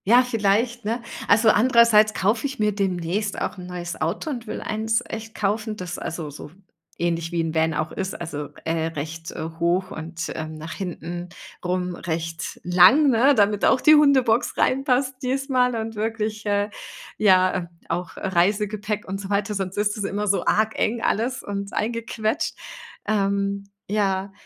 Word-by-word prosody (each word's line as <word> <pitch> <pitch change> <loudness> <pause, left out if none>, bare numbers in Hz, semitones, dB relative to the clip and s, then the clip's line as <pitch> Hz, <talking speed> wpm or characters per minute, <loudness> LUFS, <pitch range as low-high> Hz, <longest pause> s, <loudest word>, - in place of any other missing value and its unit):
Ja, 245 +4 +7
vielleicht, 235 +1 +1
ne? 230 +3 -2 0.3
Also, 220 +2 +5
andererseits 220 -2 +5
kaufe 220 +7 +1
ich 275 0 -7
mir 210 -2 +1
demnächst 195 +1 -1
auch - - -3
'n 180 - -8
neues 175 -1 -6
Auto 175 - -1
und 240 -4 -6
will - - -4
eins 220 +2 0
echt 220 0 -7
kaufen, 215 +2 -1
das 180 -2 -5
also 160 -3 -5
so 145 +1 -9 0.5
ähnlich 170 -1 -1
wie 165 -2 -1
Van 160 0 +2
auch 155 +1 -2
ist, 190 0 -4
also, 150 -4 -5 0.2
äh, 160 0 0
recht 165 +1 -6 0.3
hoch 175 +2 +1
und, 165 +2 -5
ähm, 155 0 -5
nach 155 +2 -7
hinten 175 -1 -5 0.3
rum 180 0 -1
recht 165 -1 -4
lang, 185 - +6
ne, 260 +4 +5
damit 205 -1 +2
auch 260 - +4
die 305 - +7
Hundebox 265 -6 +3
reinpasst 265 0 +2
diesmal 255 -1 +1
und 225 0 -3
wirklich, 215 0 -2
äh, 205 0 +1 0.5
ja, 185 -3 +5
ähm, 175 -2 -3 0.2
auch, 175 +1 -4
äh, - - -3
Reisegepäck 205 +3 0
und 195 +1 -4
so 190 - -7
weiter, 205 +1 0
sonst 195 -1 -3
ist 205 +1 0
es 210 - -2
immer 205 +1 -2
so 200 0 +1
arg 220 +1 +2
eng 230 +1 0
alles 240 +4 0
und 200 0 -5
eingequetscht. 230 +4 -1 0.5
Ähm, 200 -1 0 0.2
ja, 195 -2 0
205 Hz, 165 wpm, -23 LUFS, 175-225 Hz, 0.5 s, Ja